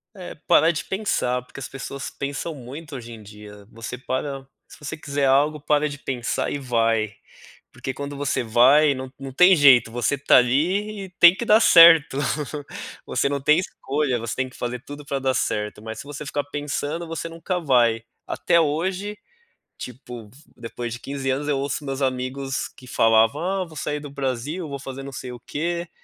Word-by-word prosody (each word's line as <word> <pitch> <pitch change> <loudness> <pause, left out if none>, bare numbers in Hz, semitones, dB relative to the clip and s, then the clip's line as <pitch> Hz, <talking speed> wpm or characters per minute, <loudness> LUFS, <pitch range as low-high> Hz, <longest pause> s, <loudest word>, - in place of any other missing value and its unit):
É 185 -2 -8
parar 160 +3 +5
de 165 - -2
pensar, 160 -11 -1
porque 130 - -12
as - - -5
pessoas 140 +1 -7
pensam 140 +4 -4
muito 140 +3 -9
hoje 120 -2 -8
em 110 -2 -10
dia, 105 0 -13
você 115 +2 -7
para 135 +1 -4 0.2
se - - -15
você 145 - -6
quiser 145 -2 -2
algo, 145 +3 +3
para 150 +1 +1
de 145 - -7
pensar 125 -4 -2
e 145 - -3
vai, 115 -4 0 0.6
porque 130 - -5
quando 145 0 -6
você 140 -3 -1
vai 135 +6 +5
não 130 0 -7
não 135 -1 -7
tem 180 +5 +7
jeito, 130 -6 +6
você 120 +3 0
tá 140 - +5
ali 190 - +1
e - - -12
tem 175 0 +9
que 235 - -4
dar 215 +1 +6
certo, 165 -8 +7 0.9
você - - 0
não 140 -1 -2
tem 150 +3 +4
escolha, 140 -7 -2
você 115 0 -4
tem 130 0 -1
que - - -18
fazer 120 0 -4
tudo 145 +1 -9
pra 140 - -2
dar 130 -1 0
certo, 105 -2 -2
mas 110 0 -7
se - - -8
você 145 +1 -7
ficar 145 0 -2
pensando 145 +3 -4
você 165 0 -4
nunca 165 +2 -3
vai. 120 -7 +2 0.2
Até 170 - +2
hoje, 185 +7 -2 0.6
tipo, 120 -3 -9 0.3
depois 120 0 -6
de 120 - -7
15 135 -1 -4
anos 140 +3 -1
eu 140 - +1
ouço 140 +2 -3
meus 135 0 -4
amigos 130 +1 -2
que 125 - -17
falavam 115 +6 +3
ah 190 +1 -1
vou 165 -2 -15
sair 150 +2 -2
do 145 -1 -9
Brasil, 140 +5 -3
vou 140 -1 -5
fazer 135 0 -7
não 140 - -7
sei 125 -1 -7
o 120 - -10
quê, 170 +5 -3
140 Hz, 190 wpm, -23 LUFS, 125-150 Hz, 0.9 s, tem